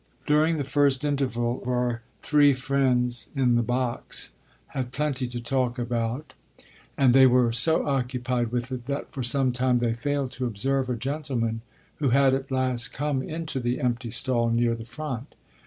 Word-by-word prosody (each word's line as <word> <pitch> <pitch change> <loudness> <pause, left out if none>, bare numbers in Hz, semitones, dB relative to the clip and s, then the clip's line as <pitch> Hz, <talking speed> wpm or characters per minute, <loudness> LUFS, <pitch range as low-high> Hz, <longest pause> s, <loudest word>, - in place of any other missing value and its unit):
During 155 +2 +3
the 145 - -1
first 140 0 +2
interval 125 -4 -1
our 125 -1 -1 0.2
three 145 -2 +5
friends 125 -3 0
in 130 -3 +3
the 120 - +3
box 125 +1 -2 0.4
had 130 -2 -4
plenty 135 -2 -1
to 120 0 -5
talk 125 +1 -1
about, 120 +3 -2 0.6
and 130 -3 +5
they 130 0 +8
were 125 -2 +4
so 160 +8 +2
occupied 125 -3 -1
with 125 +1 -2
it 125 -1 -5
that 140 0 -4
for 135 - -5
some 130 +1 +1
time 125 0 +2
they 120 -1 +1
failed 135 +3 -2
to 125 -1 -3
observe 130 +4 -1
a 125 - 0
gentleman 125 -3 -2 0.4
who 140 -3 +1
had 135 +1 +4
at 135 0 -2
last 130 -2 0
come 145 -1 -1
into 155 -1 -4
the 120 0 -1
empty 120 -1 -1
stall 120 0 +1
near 115 0 +2
the 115 -1 -6
front. 130 +1 -6
125 Hz, 170 wpm, -26 LUFS, 120-135 Hz, 0.6 s, they